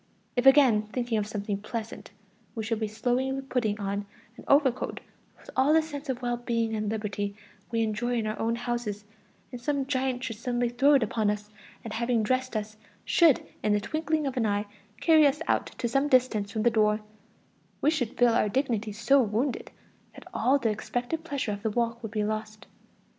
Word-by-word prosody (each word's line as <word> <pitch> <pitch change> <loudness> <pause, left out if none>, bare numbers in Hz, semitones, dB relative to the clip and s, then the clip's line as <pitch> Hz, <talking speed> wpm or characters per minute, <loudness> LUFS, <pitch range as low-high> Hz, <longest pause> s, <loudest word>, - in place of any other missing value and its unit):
If 245 +1 +2
again, 255 -7 +6
thinking 240 -3 -1
of 205 - -2
something 205 -1 -3
pleasant, 225 +1 -6 0.5
we 225 - -3
should 225 0 -1
be 220 - -1
slowly 255 +5 -1
putting 240 -6 -1
on 200 0 -3 0.3
an - - -12
overcoat 270 -3 +2 0.4
with - - -13
all 270 +4 +4
the 320 - +6
sense 290 -2 -7
of 255 -1 -3
well 240 0 0
being 230 -2 -1
and 215 -1 -2
liberty 205 -2 -3 0.3
we 230 -1 +1
enjoy 230 +3 -1
in 225 -2 0
our 215 0 -3
own 230 +1 0
houses, 235 -4 -3 0.5
and 245 -2 -7
some 280 +1 0
giant 260 -2 -1
should 225 -4 -4
suddenly 240 +1 -1
throw 275 +5 +4
it 265 - +4
upon 215 -1 0
us, 210 0 -3 0.3
and 225 - -6
having 235 0 +1
dressed 255 +2 0
us, 215 0 -5 0.3
should 330 -6 +4 0.2
in 210 - +2
the 210 - +3
twinkling 310 +7 -1
of 270 -1 -2
an 225 -3 +2
eye, 205 0 0 0.3
carry 315 -3 +6
us 285 +2 0
out - - +1
to 240 - -1
some 275 +4 +1
distance 245 -7 +2
from 215 0 -2
the 240 - +4
door, 215 -1 +2 0.8
we 300 - +3
should 250 -8 -2
feel 245 -1 +5
our 215 - +2
dignity 230 -3 -1
so 265 +6 +3
wounded, 240 +4 -1 0.5
that - - -12
all 270 +3 +3
the 235 -5 0
expected 245 +8 -3
pleasure 280 -8 -2
of 205 0 -5
the 220 - 0
walk 235 +1 -1
would 225 - -5
be 210 -1 -1
lost. 215 +1 -4
235 Hz, 195 wpm, -28 LUFS, 215-260 Hz, 0.8 s, again